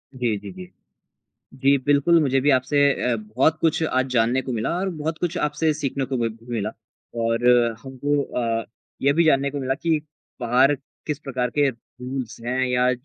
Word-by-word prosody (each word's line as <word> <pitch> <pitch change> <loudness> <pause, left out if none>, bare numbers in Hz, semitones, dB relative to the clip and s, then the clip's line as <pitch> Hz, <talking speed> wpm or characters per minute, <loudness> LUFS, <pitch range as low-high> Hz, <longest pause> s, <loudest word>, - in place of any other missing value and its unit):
जी, 120 -5 0
जी, - - -9
जी। 185 0 -11 0.8
जी, 140 +1 +3
बिल्कुल 145 +4 +4
मुझे 135 -2 +2
भी 145 - +2
आपसे 130 +2 +1 0.3
अ, - - +2
बहुत 115 +9 +1
कुछ 165 0 +2
आज 130 -4 +1
जानने 120 +2 +2
को 130 - -5
मिला 110 -1 -1
और 190 +1 -1
बहुत 160 -1 -4
कुछ 175 0 -2
आपसे 150 +1 +1
सीखने 140 -2 -2
को 130 0 -3
भी 115 -1 0 0.2
मिला। 105 -2 -1 0.5
और 115 +1 0 0.4
हमको 140 +2 -1
अ, 115 -2 -2 0.4
ये 140 +1 +3
भी 170 +3 +3
जानने 140 -3 +3
को 145 - -4
मिला 135 0 0
कि 160 +1 0 0.4
बाहर 125 +4 +4 0.3
किस 150 -2 -2
प्रकार 130 -4 -2
के 145 -1 +4
रूल्स 125 0 -7
हैं 125 +2 -1
या 125 0 +2
135 Hz, 180 wpm, -23 LUFS, 125-150 Hz, 0.8 s, बिल्कुल